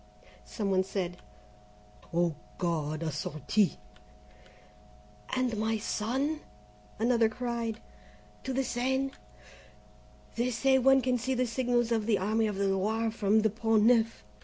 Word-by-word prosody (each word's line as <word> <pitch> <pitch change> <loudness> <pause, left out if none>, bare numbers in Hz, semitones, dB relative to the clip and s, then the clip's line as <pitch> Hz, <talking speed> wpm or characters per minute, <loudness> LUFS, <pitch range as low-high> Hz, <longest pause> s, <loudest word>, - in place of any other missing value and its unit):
Some 205 -4 -3
one 190 0 +3
said: 185 -2 -3 0.9
"Oh, 170 -1 +1 0.2
God 155 -2 -1
a 160 - -1
sortie 155 +7 0 1.6
and 255 -3 0
my 220 +1 0
son?" 260 +8 -1 0.6
Another 230 0 +3
cried: 235 -1 -3 0.7
"To 265 - -2
the 265 +1 0
Seine? 265 +2 -1 1.3
They 240 +2 +1
say 265 +2 +3
one 270 +1 +5
can 250 -1 +1
see 260 +3 -1
the 255 0 +1
signals 240 -1 0
of 220 -2 0
the 215 -3 +3
Army 215 +3 +1
of 210 - -3
the 200 0 0
Loire 215 +4 0
from 215 0 +2
the 220 -1 +2
Pont 225 0 +2
Neuf." 230 - +3
225 Hz, 135 wpm, -30 LUFS, 200-245 Hz, 1.6 s, one